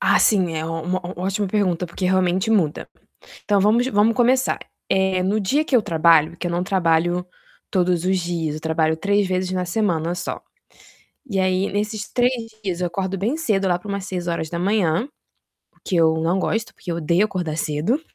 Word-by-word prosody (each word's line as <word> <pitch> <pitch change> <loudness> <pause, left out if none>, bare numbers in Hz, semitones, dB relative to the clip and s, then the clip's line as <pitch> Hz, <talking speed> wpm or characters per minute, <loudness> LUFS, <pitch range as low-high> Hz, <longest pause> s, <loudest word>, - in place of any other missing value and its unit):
Ah, - - +4
sim, 185 -6 +3
é 160 0 -2
uma 165 0 -4
uma 185 +2 -1
ó 180 0 -6
ótima 195 +1 -1
pergunta, 185 -3 0
porque 175 +2 -6
realmente 185 +2 +1
muda. 175 -9 +1 0.6
Então 205 -2 +2
vamos 225 +5 +3
vamos 215 0 +3
começar, 255 +2 +2 0.3
eh, 190 -1 +1
no 200 +3 +1
dia 280 +11 +1
que 265 - +2
eu 225 - +3
trabalho, 165 -3 +3
que 175 - -4
eu - - -1
não 175 +1 -1
trabalho 175 -1 +1 0.4
todos 180 -2 +1
os 190 0 +2
dias, 165 -3 -2
eu - - -7
trabalho 160 0 +1
3 200 +3 +1
vezes 185 0 -1
na 185 -1 -1
semana 175 -3 0
só. 180 - -5 0.9
E 195 - -1
aí, 185 +1 +1
nesses 210 +1 -3
3 245 0 +2 0.3
dias 180 -2 -3
eu 175 - +1
acordo 190 +2 -3
bem 230 - -1
cedo, 200 -11 0
lá 175 -1 +2
pra 210 - -12
umas 200 -1 -3
6:00, 175 - -1 0.7
o - - -39
que 185 - -1
eu 160 -1 +4
não 170 +4 +1
gosto, 220 +3 -1
porque 180 - -8
eu - - -3
odeio 170 +4 +2
acordar 175 -7 -3
cedo, 160 - 0
185 Hz, 190 wpm, -22 LUFS, 170-205 Hz, 0.9 s, Ah